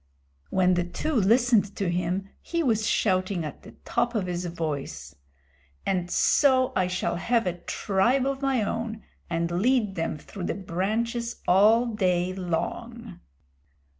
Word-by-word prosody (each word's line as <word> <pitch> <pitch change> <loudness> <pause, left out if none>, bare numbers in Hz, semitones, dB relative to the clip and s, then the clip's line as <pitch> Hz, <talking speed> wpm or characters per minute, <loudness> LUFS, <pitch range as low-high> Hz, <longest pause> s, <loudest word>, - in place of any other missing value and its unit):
When 185 -1 +3
the 175 0 +1
two 245 - -3
listened 225 -2 +3
to 195 - -1
him 180 +2 -1
he 335 -1 -2
was 220 -5 +1
shouting 185 -3 +1
at 150 - -7
the - - -13
top 240 0 0
of 205 -4 0
his 180 0 -3
voice, 140 - -4 0.7
"And 180 -2 0
so 260 +2 +3
I 185 -1 +2
shall 180 -1 -1
have 230 +6 +1
a 175 -1 -2
tribe 215 +10 +1
of 275 0 -2
my 270 -5 +1
own, 225 +1 -3 0.3
and 170 +1 -1
lead 235 -4 +2
them 165 -3 -2
through 175 +4 -8
the - - -2
branches 220 +6 -2
all 215 +6 +5
day 185 -5 0
long." 195 +4 -4
195 Hz, 145 wpm, -26 LUFS, 175-235 Hz, 0.7 s, all